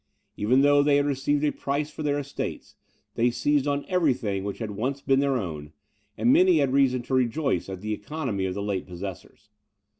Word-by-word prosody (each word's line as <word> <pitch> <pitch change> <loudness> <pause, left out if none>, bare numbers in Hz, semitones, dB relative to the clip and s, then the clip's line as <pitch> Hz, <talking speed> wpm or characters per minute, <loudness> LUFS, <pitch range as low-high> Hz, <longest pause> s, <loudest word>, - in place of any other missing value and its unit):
Even 125 +6 +3
though 145 0 +5
they 145 0 +3
had 145 - +2
received 145 +1 0
a 150 - +2
price 145 +2 -3
for - - -8
their 145 -1 0
estates, 140 -1 -5 0.4
they 120 +1 +2
seized 140 +4 +1
on 145 0 -1
every 170 -8 +2
thing 100 -6 -3
which 100 0 -4
had 110 -3 -5
once 130 +7 -2
been 135 -1 +2
their 140 -1 +1
own; 75 -8 -6 0.4
and 250 - +4
many 360 +2 +5
had 135 - +1
reason 130 -3 +3
to 130 - -6
rejoice 130 - 0
at 95 -1 -6
the 110 +1 -2
economy 105 -3 -3
of 90 - -4
the 100 - -3
late 100 -3 -3
possessors. 95 +2 -9
130 Hz, 205 wpm, -26 LUFS, 105-145 Hz, 0.4 s, though